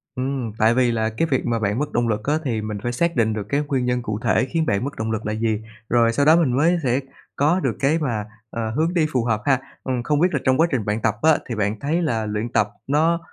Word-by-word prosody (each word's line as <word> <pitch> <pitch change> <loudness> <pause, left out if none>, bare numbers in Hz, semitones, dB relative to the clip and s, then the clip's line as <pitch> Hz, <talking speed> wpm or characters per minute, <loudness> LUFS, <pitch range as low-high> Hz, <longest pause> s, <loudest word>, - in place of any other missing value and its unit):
Ừm, 130 -3 -2
tại 110 +2 +4
vì 125 -1 +3
là 110 -1 0
cái 115 +9 -1
việc 130 - +1
mà 115 -1 0
bạn 105 +3 0
mất 150 - -2
động 120 0 +1
lực 105 -1 -1
á 145 - 0
thì 115 -5 -1
mình 105 -1 -4
phải 120 - -1
xác 170 +6 0
định 110 -2 +2
được 105 -2 -3
cái 140 +1 +1
nguyên 130 -4 0
nhân 125 0 0
cụ 105 -3 -3
thể - - +2
khiến 165 -2 0
bạn 100 -1 0
mất 140 - -4
động 110 0 -2
lực 110 - -3
là 105 - -1
gì, 110 -1 -1 0.3
rồi 115 -1 +3
sau 140 +4 +2
đó 160 +2 +7
mình 140 -8 +2
mới 170 +4 +3
sẽ 125 +1 +2 0.4
có 155 +6 +2
được - - -1
cái 150 +4 +2
mà, 115 -8 -2 0.2
ờ, 115 -1 -3
hướng 160 +8 0
đi 165 -3 +2
phù 125 -3 +1
hợp 110 -3 0
ha. 135 -2 +3 0.2
Ừm, 125 -2 -2
không 150 +2 +1
biết 180 - +5
là 140 - +1
trong 130 0 +3
quá 165 - +4
trình 120 -6 -1
bạn 105 +1 -1
tập 110 -2 +1
á, 160 -1 +5
thì 115 - -2
bạn 105 0 -1
thấy 160 +5 0
là 115 -9 0
luyện 105 +3 -3
tập 105 -3 +2 0.2
nó 160 +4 +2
120 Hz, 285 wpm, -22 LUFS, 110-145 Hz, 0.4 s, đó